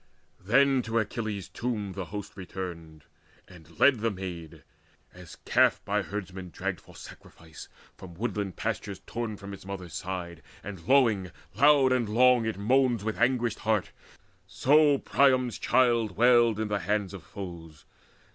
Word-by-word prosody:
Then 135 +6 +3
to 115 -1 -3
Achilles' 110 -3 -3
tomb 110 -5 -4
the 95 -1 -5
host 105 +3 -8
returned, 85 -5 -8 0.4
And 85 -3 -17
led 130 -5 +5
the 115 +1 0
maid, 85 -6 -8 0.5
as 90 -2 -12
calf - - +3
by 105 +1 0
herdmen 95 -2 -6
dragged 80 - -4
For - - -18
sacrifice, 80 -2 -13 0.3
from 85 -2 -11
woodland 105 -2 -3
pastures 105 -3 -4
torn 115 -3 -4
From 100 0 -9
its 100 - -10
mother's 95 -4 -7
side, 90 -2 -5 0.2
and 95 -4 -9
lowing 115 -9 +3 0.2
long 140 -2 +5
and 120 -4 +1
loud 125 +1 +4
It 110 - -3
moans 120 +1 +2
with 110 0 -3
anguished 120 -1 +1
heart; 110 -3 0 0.6
so 145 +8 +4
Priam's 130 -4 +2
child 115 -6 +2
Wailed 120 -2 +4
in 110 - -1
the 105 -1 -1
hands 100 0 -1
of 100 - -8
foes. 85 -5 -10
105 Hz, 145 wpm, -28 LUFS, 95-120 Hz, 0.6 s, led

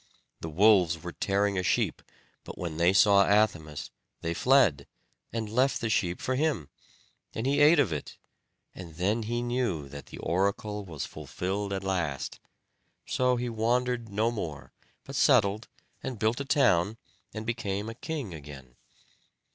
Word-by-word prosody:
The 80 - -5
wolves 90 -2 +4
were 90 - -5
tearing 100 +1 0
a - - +1
sheep; 90 - 0 0.4
but - - -9
when 85 -3 -4
they 85 +2 +4
saw 100 +1 +6
Athamas 85 -8 +1 0.3
they 85 - -2
fled, 95 - +3 0.4
and 115 -2 -3
left 125 +4 +1
the 115 -2 -2
sheep 90 -4 0
for 130 - -1
him, 130 - 0 0.7
and 110 - -2
he 140 +2 +2
ate 150 +3 +7
of 125 - +2
it; 75 - -6 0.6
and 85 -4 -10
then 100 +7 0
he 120 +2 -2
knew 120 - -1
that 70 0 -9
the - - -10
oracle 100 +3 -1
was 80 -6 -5
fulfilled 100 +2 -4
at 95 0 -3
last. 85 -8 -2 0.7
So 125 0 +1
he 120 0 -2
wandered 120 +1 0
no 110 +3 +1
more; 80 - -6 0.3
but 135 - -9
settled, 110 -6 +3 0.3
and 130 -3 -5
built 110 +4 0
a - - -4
town, 110 - +3 0.3
and 110 0 -6
became 105 -3 -2
a 115 - -5
king 135 - -5
again. 70 -5 -11
105 Hz, 155 wpm, -28 LUFS, 85-120 Hz, 0.7 s, ate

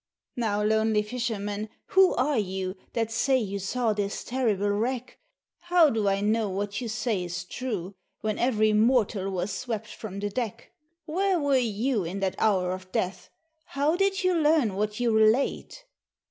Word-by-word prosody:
"Now, 210 -3 0
lonely 220 0 +2
fisherman, 210 -2 -3 0.2
who 380 -1 +5
are 265 0 +1
you 190 -1 -3 0.2
That 225 -1 -1
say 265 +3 +2
you 200 -4 -2
saw 225 +4 0
this 205 -1 -3
terrible 215 -6 0
wreck? 240 +4 -2 0.4
How 350 -3 +4
do 220 -2 0
I 195 0 +1
know 215 0 +1
what 205 +2 -3
you 240 - -3
say 220 -3 -1
is 175 0 -5
true, 200 -4 -4 0.3
When 215 -1 -2
every 215 -3 +2
mortal 215 -3 +2
was 185 +1 -2
swept 220 +1 -4
from 200 -3 -7
the 205 0 -3
deck? 230 -1 -4 0.3
Where 370 +3 +1
were 285 -2 +2 0.2
you 235 -3 +1
in 180 +4 -4
that 190 -1 0
hour 190 -4 +2
of 185 0 -7
death? 185 +1 -2 0.4
How 290 +4 0
did 390 +1 +1
you 370 0 +3
learn 305 - +3
what 210 +2 -2
you 240 -1 +2
relate?" 220 - +2
215 Hz, 165 wpm, -27 LUFS, 200-255 Hz, 0.4 s, who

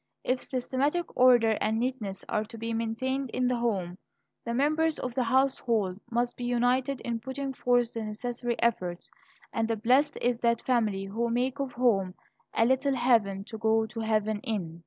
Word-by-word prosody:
If 255 0 0
systematic 275 +6 -1
order 240 -3 +5
and 220 +1 +1
neatness 230 -6 -3
are 210 - 0
to 230 +1 -10
be 230 +1 -3
maintained 250 +4 -2
in 250 0 +1
the 250 0 +1
home, 190 -7 -2 0.4
the 235 - -3
members 310 +4 +2
of 250 - -4
the 255 - 0
household 230 -6 +1
must 240 +1 0
be 245 - -7
united 245 +2 +1
in 235 -1 -3
putting 265 +3 -4
forth 245 -2 +1
the 225 -1 -4
necessary 240 +3 -3
efforts. 180 -7 -1 0.4
And 225 0 0 0.2
blessed 260 +5 +3
is 240 -1 0
that 235 -1 +1
family 215 -6 +1
who 230 +4 -2
make 250 +4 0
of 275 -2 -3
home 200 -7 +1 0.4
"a 225 - +4
little 265 +2 +2
heaven 225 -6 +2
to 220 +1 -9
go 220 0 +2
to 225 +1 -8
heaven 220 -1 0
in." 180 -7 -4
235 Hz, 175 wpm, -28 LUFS, 220-255 Hz, 0.4 s, order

